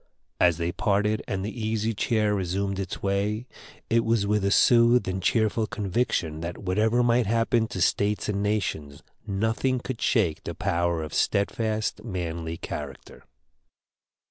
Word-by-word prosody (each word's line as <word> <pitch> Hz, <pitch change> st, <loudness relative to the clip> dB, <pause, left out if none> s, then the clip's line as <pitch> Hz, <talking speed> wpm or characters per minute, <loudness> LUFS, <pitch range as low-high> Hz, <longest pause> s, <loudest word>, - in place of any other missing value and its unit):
As 85 Hz, -3 st, +4 dB
they 85 Hz, 0 st, -1 dB
parted 105 Hz, +3 st, +1 dB
and 95 Hz, 0 st, -2 dB
the 110 Hz, +2 st, -5 dB
Easy 110 Hz, 0 st, 0 dB
Chair 105 Hz, 0 st, +1 dB
resumed 95 Hz, +1 st, -1 dB
its 95 Hz, -2 st, -5 dB
way, 100 Hz, +4 st, 0 dB, 0.4 s
it 115 Hz, 0 st, +2 dB
was 115 Hz, -3 st, +1 dB
with 105 Hz, 0 st, +1 dB
a 100 Hz, -, +2 dB
soothed 115 Hz, 0 st, +5 dB
and 95 Hz, 0 st, -2 dB
cheerful 110 Hz, +2 st, +1 dB
conviction 95 Hz, -7 st, -1 dB
that 85 Hz, +1 st, -5 dB
whatever 110 Hz, +5 st, +1 dB
might 120 Hz, -2 st, +3 dB
happen 115 Hz, +1 st, +2 dB
to 120 Hz, -, -6 dB
states 105 Hz, +1 st, +1 dB
and 100 Hz, -1 st, -1 dB
nations, 90 Hz, -9 st, -2 dB, 0.2 s
nothing 110 Hz, +6 st, 0 dB
could 125 Hz, -1 st, -6 dB
shake 95 Hz, -11 st, +1 dB
the -, -, -5 dB
power 85 Hz, -4 st, 0 dB
of 75 Hz, -, -7 dB
steadfast, 110 Hz, +2 st, 0 dB
manly 85 Hz, -5 st, -4 dB
character. 70 Hz, -5 st, -8 dB
105 Hz, 145 wpm, -26 LUFS, 90-110 Hz, 0.4 s, soothed